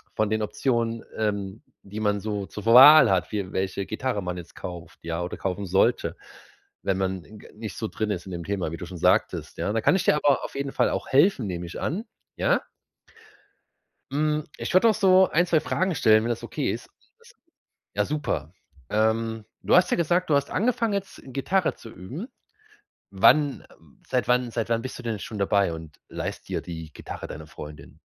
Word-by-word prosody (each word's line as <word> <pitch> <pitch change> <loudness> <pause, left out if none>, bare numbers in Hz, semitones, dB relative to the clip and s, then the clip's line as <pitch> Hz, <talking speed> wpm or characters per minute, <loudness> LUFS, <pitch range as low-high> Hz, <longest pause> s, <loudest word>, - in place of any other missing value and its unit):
von 110 -1 +1
den 110 0 0
Optionen, 115 0 -1
ähm, 100 -1 -2 0.2
die 105 +2 -7
man 105 -1 +1
so 105 -2 -3
zur 105 - -8
Wahl 135 +6 +9
hat. 90 -2 +1
Wie 100 -3 -3
welche 95 +1 -2
Gitarre 130 -6 -2
man 90 0 -4
jetzt 85 -1 -10
kauft, 85 -2 -8
ja, 85 +1 -3
oder 90 - -5
kaufen 95 +1 -3
sollte. 95 +2 +2 0.7
Wenn 95 -1 0
man 95 -2 -2 0.2
g - - -14
nicht 110 -2 -7
so 110 - -2
drin 110 -1 -3
ist 90 -2 -4
in - - -7
dem 85 -1 -5
Thema, 95 -5 -2
wie 85 - -5
du 90 - -7
schon 90 0 -8
sagtest, - - +1
ja? 105 - -1
Da 115 - 0
kann 185 - +4
ich 190 - +1
dir - - +5
aber 145 -2 +2
auf - - -9
jeden 140 0 -3
Fall - - +2
auch - - -3
helfen, 140 - +4
nehme 90 -1 -4
ich 85 - -7
an, 200 - -2 0.3
ja? - - +2 1.5
Hm. 150 +1 +1
Ich - - -4
würde 205 +5 +6
auch - - +4
so 190 -2 +5
1, 175 +3 +3
2 160 - +3
Fragen 185 +1 -1
stellen, 110 -2 +5
wenn 120 - -2
das 120 - -2
okay - - -2
ist? - - -6 1.1
Ja, 105 - +4
super. 95 - -3 0.4
Ähm, 110 0 0 0.2
du - - 0
hast 180 - +6
ja - - +2
gesagt, 175 +1 +1
du 145 - +4
hast 140 0 0
angefangen, 230 +1 +1
jetzt 200 -1 -4
Gitarre 140 +8 0
zu 115 - -12
üben. 125 - -8 0.8
Wann 140 +9 +4 0.4
seit 125 -1 -1
wann 125 -1 +2
seit 115 0 -2
wann 115 0 0
bist 130 - -6
du 125 - -10
denn 110 -4 -3
schon 110 - -6
dabei, 100 -2 +2
und 80 -2 -10
leihst - - -5
dir - - -2
die 80 -3 -8
Gitarre - - -8
deiner 75 0 -8
Freundin? 75 -1 -11
110 Hz, 200 wpm, -25 LUFS, 95-145 Hz, 1.5 s, Wahl